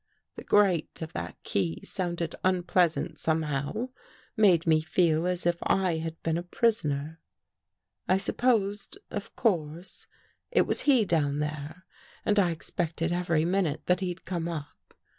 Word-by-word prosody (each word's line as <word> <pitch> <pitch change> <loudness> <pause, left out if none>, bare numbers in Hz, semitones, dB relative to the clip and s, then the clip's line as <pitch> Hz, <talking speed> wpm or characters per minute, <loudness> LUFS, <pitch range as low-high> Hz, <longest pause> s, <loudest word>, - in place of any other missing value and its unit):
The - - -8
grate 190 -6 +2
of 160 - -8
that 85 -2 -5
key 85 -4 -1
sounded 170 -3 -3
unpleasant 180 -2 +1
somehow, 160 - -1 0.5
made 185 -6 +4
me 160 -1 +4
feel 165 0 +2
as 180 -1 -2
if 175 0 +2
I 185 -4 +1
had 165 0 -5
been 165 +1 0
a - - -3
prisoner. 160 -6 0 0.9
I 185 - +4
sup 195 - -3
posed, 210 - +1
of - - -6
course, 170 -4 -2 0.4
it - - +4
was - - 0
he 250 -6 +5
down 145 -5 +1
there 150 +4 -5 0.4
and 210 -1 +3
I 185 -3 +4
ex 165 -1 -6
pected 165 0 -1
every 170 -3 +1
minute 175 -4 0
that 180 0 +2
he'd 185 -1 -4
come 170 -2 -2
up. 150 -4 -8
170 Hz, 150 wpm, -28 LUFS, 155-185 Hz, 0.9 s, he